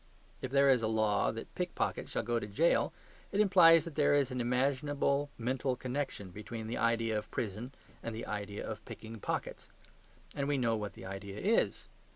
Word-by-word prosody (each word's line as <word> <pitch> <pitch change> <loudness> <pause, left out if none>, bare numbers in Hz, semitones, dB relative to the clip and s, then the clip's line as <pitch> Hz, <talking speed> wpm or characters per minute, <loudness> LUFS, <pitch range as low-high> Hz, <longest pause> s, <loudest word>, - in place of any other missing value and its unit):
If 130 - -3
there 140 +1 +4
is 125 -3 +4
a 110 - +1
law 110 - +2
that - - -8
pick - - -3
pockets - - -1
shall - - -1
go 120 +1 0
to 105 - -5
prison, 155 +12 +3 0.4
it 200 - 0
implies 180 -5 +7
that 165 - -6
there 145 -1 +3
is 140 -2 +2
an 125 -1 -1
imaginable 140 +3 +1
mental 130 +2 -1
connection 125 -6 -4
between 110 +3 -6
the 115 +2 -3
idea 115 -1 +1
of 105 - -3
prison 110 +4 -4 0.3
and 115 -1 -5
the 115 - -5
idea 105 -1 -4
of - - -6
picking 110 0 -9
pockets. - - -4 0.6
And 140 - -2
we 145 -1 +1
know 115 -3 +2
what 105 -2 -4
the - - -10
idea 95 +1 -6
is. 225 +3 +2
120 Hz, 190 wpm, -33 LUFS, 110-140 Hz, 0.6 s, implies